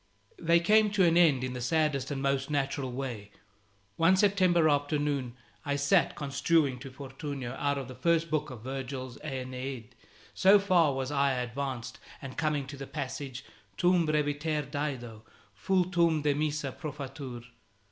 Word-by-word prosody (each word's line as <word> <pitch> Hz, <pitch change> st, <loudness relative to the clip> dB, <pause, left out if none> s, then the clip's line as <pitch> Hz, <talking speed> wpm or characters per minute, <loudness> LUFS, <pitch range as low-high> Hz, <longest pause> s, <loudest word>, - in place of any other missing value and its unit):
They 170 Hz, 0 st, +4 dB
came 210 Hz, +5 st, +4 dB
to 200 Hz, -3 st, +4 dB
an 170 Hz, -1 st, +4 dB
end 155 Hz, -7 st, +5 dB
in 130 Hz, 0 st, -3 dB
the 125 Hz, -, -5 dB
saddest 150 Hz, -1 st, +1 dB
and 140 Hz, -2 st, -3 dB
most 135 Hz, 0 st, 0 dB
natural 135 Hz, -2 st, -1 dB
way. 120 Hz, -6 st, -5 dB, 0.7 s
One 165 Hz, +3 st, +5 dB
September 185 Hz, -4 st, +4 dB
afternoon 145 Hz, -3 st, 0 dB, 0.3 s
I 140 Hz, 0 st, -1 dB
sat 140 Hz, 0 st, +2 dB
construing 140 Hz, -1 st, +1 dB
to 135 Hz, +1 st, -8 dB
Fortunio 135 Hz, -1 st, -6 dB
out 145 Hz, 0 st, 0 dB
of 135 Hz, -2 st, -5 dB
the 130 Hz, -, -8 dB
first 165 Hz, +4 st, +1 dB
book 150 Hz, -1 st, 0 dB
of 120 Hz, -4 st, -9 dB
Virgil's 130 Hz, -1 st, -5 dB
"Aeneid" 130 Hz, -4 st, -5 dB, 0.4 s
so 195 Hz, +2 st, +6 dB
far 180 Hz, -8 st, +3 dB
was 135 Hz, +1 st, -3 dB
I 140 Hz, -1 st, +2 dB
advanced; 125 Hz, 0 st, -4 dB, 0.2 s
and 135 Hz, -2 st, -8 dB
coming 150 Hz, -3 st, 0 dB
to 140 Hz, +1 st, -9 dB
the 135 Hz, 0 st, -7 dB
passage 135 Hz, -1 st, -5 dB, 0.3 s
"Tum 175 Hz, -2 st, +3 dB
breviter 150 Hz, 0 st, 0 dB
Dido, 125 Hz, -7 st, -4 dB, 0.4 s
vultum 175 Hz, -4 st, +2 dB
demissa, 145 Hz, -1 st, -1 dB
profatur". 140 Hz, -5 st, -7 dB
140 Hz, 145 wpm, -29 LUFS, 130-160 Hz, 0.7 s, so